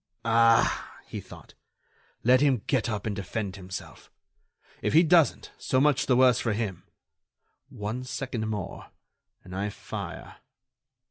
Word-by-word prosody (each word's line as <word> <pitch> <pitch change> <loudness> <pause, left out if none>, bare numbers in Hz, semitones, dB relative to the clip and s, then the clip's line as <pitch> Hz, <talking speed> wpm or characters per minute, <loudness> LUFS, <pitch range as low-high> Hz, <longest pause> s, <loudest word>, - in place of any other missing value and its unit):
"Ah!" 115 0 +3
he - - -6
thought, - - -14 0.7
"let 125 +2 +5
him 135 -7 +2
get 130 -4 0
up 105 -2 -3
and 105 -2 -2
defend 100 0 -4
himself. 95 -1 -9 0.7
If - - -1
he 160 +3 +7
doesn't, 165 -2 +3
so 130 - +1
much 145 -1 +3
the 125 - +4
worse 125 -2 +5
for 115 - 0
him. 100 -5 -4 0.8
One 110 +5 -5
second 125 -4 -4
more... 105 -4 -5 0.6
and 90 0 -9
I 100 +2 -1
fire...." - - -7
115 Hz, 135 wpm, -27 LUFS, 105-130 Hz, 0.8 s, he